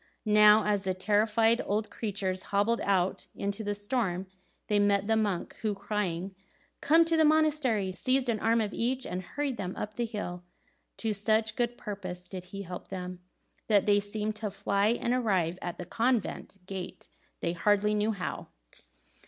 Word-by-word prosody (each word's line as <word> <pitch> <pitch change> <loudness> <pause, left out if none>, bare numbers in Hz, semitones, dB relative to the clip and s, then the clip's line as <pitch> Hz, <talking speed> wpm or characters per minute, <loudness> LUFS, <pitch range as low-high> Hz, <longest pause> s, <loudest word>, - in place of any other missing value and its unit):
Now 210 0 +7
as 205 -2 0
the 185 -1 0
terrified 215 +4 +3
old 210 +1 -1
creatures 190 -4 -3
hobbled 205 +4 +2
out 190 -2 +1
into 200 +2 -3
the 205 0 -1
storm, 205 -3 -1 0.4
they 210 -1 +2
met 205 -1 +3
the 225 +1 +2
monk, 205 -5 -1
who, 215 -2 0
crying, 190 -3 -3 0.5
"Come 325 +3 +5
to 330 0 +2
the 320 - +4
monastery!" 300 -10 +2
seized 255 +6 0
an 225 -3 0
arm 225 +2 +3
of 210 -1 -2
each, 255 +2 -1
and 180 - -3
hurried 275 +6 -3
them 185 -1 -4
up 210 - -5
the 240 +1 -1
hill. 180 -5 -5 0.5
To 220 -2 -1
such 215 +1 +1
good 240 0 -1
purpose 185 -4 -6
did 185 -1 -7
he 195 +2 -7
help 180 -1 -8
them, 180 -1 -6 0.5
that 205 -3 +4
they 205 -1 +4
seemed 210 +1 -3
to 210 -1 -3
fly, 200 +1 0
and 240 - 0
arrived 185 -8 +1
at 175 - -4
the 180 - -6
convent 230 -1 -1
gate 190 -1 -7 0.3
they 170 - 0
hardly 205 +4 +2
knew 210 +1 +1
how. 195 -4 -4
210 Hz, 170 wpm, -29 LUFS, 190-225 Hz, 0.5 s, Now